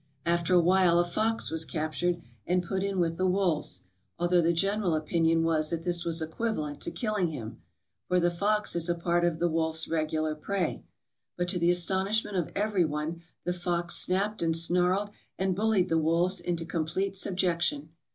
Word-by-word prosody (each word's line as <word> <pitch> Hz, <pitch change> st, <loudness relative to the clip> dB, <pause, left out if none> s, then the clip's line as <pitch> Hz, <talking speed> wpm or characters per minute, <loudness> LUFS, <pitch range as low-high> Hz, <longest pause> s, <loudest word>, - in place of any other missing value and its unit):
After 170 Hz, +1 st, +2 dB
a -, -, +7 dB
while 180 Hz, 0 st, +4 dB
a 175 Hz, -, +3 dB
fox 220 Hz, +5 st, 0 dB
was 160 Hz, 0 st, 0 dB
captured, 165 Hz, +2 st, -2 dB, 0.2 s
and 180 Hz, 0 st, +1 dB
put 190 Hz, +2 st, -2 dB
in 195 Hz, -1 st, -1 dB
with 165 Hz, -1 st, 0 dB
the 185 Hz, -, +1 dB
wolves, 180 Hz, -4 st, 0 dB, 0.3 s
although 175 Hz, 0 st, +3 dB
the 165 Hz, +1 st, +3 dB
general 195 Hz, 0 st, +1 dB
opinion 165 Hz, +1 st, +1 dB
was 155 Hz, -2 st, +1 dB
that 165 Hz, -1 st, -3 dB
this 175 Hz, -1 st, +1 dB
was 165 Hz, -1 st, +1 dB
equivalent 160 Hz, -4 st, -3 dB
to -, -, -1 dB
killing 215 Hz, -6 st, -1 dB
him, 120 Hz, -9 st, -7 dB, 0.5 s
for 180 Hz, 0 st, +2 dB
the 175 Hz, 0 st, +2 dB
fox 210 Hz, +4 st, 0 dB
is 170 Hz, 0 st, 0 dB
a 175 Hz, -, +2 dB
part 170 Hz, 0 st, 0 dB
of 170 Hz, -2 st, +1 dB
the 175 Hz, +1 st, +1 dB
wolf's 160 Hz, -1 st, +1 dB
regular 155 Hz, -1 st, -1 dB
prey; 180 Hz, +3 st, -2 dB, 0.5 s
but 175 Hz, 0 st, -1 dB
to 180 Hz, -, 0 dB
the 170 Hz, 0 st, +3 dB
astonishment 190 Hz, +4 st, +1 dB
of 175 Hz, -4 st, -1 dB
every 205 Hz, -2 st, +1 dB
one 155 Hz, +2 st, -3 dB, 0.2 s
the 180 Hz, -, -1 dB
fox 175 Hz, -1 st, -1 dB
snapped 200 Hz, +4 st, 0 dB
and 165 Hz, -1 st, +2 dB
snarled 180 Hz, +4 st, +2 dB, 0.3 s
and 190 Hz, -1 st, 0 dB
bullied 205 Hz, -2 st, +2 dB
the 165 Hz, -, +2 dB
wolves 170 Hz, +4 st, +2 dB
into 170 Hz, -1 st, -3 dB
com 165 Hz, -2 st, -2 dB
plete 190 Hz, +4 st, -2 dB
subjection. 175 Hz, -6 st, -1 dB
175 Hz, 185 wpm, -28 LUFS, 165-190 Hz, 0.5 s, a